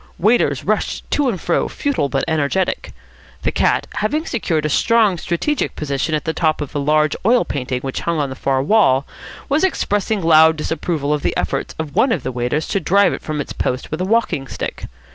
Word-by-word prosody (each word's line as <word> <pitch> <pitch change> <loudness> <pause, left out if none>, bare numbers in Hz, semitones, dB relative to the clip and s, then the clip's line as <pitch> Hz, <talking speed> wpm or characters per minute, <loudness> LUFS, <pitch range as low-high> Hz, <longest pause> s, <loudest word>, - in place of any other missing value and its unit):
Waiters 220 +7 +2
rushed - - -1
to 290 -3 +2
and 195 -7 -3
fro, 170 - 0
futile 275 - -1
but 135 -1 -1
energetic. 160 +4 -1 0.5
The - - +1
cat, - - +1
having 300 +10 0
secured 165 -9 -1
a - - +3
strong 210 +2 +3
strategic 230 - -1
position 150 +1 -1
on 150 - -1
the 160 - -2
top 160 -2 +1
of 150 -3 -5
a 145 - -1
large 150 +1 +2
oil 240 +5 +3
painting 125 -2 -3
which 135 0 -4
hung 170 -1 -1
on 140 -2 -1
the - - -5
far 135 -1 0
wall, 140 -8 +3 0.4
was 290 +5 +1
expressing 205 - 0
loud 160 0 +6
disapproval 150 -1 -2
of 150 - -1
the - - -1
efforts - - -2
of 155 -3 -5
one 260 - +3
of 170 - -1
the 130 - -3
waiters 125 +5 -1
to 195 - +1
drive 200 +4 +3
it - - -5
from 155 -1 -4
its 145 - -4
post 125 0 -3
with 155 +3 -3
a - - 0
walking 190 -10 0
stick. - - -5
160 Hz, 205 wpm, -19 LUFS, 145-205 Hz, 0.5 s, loud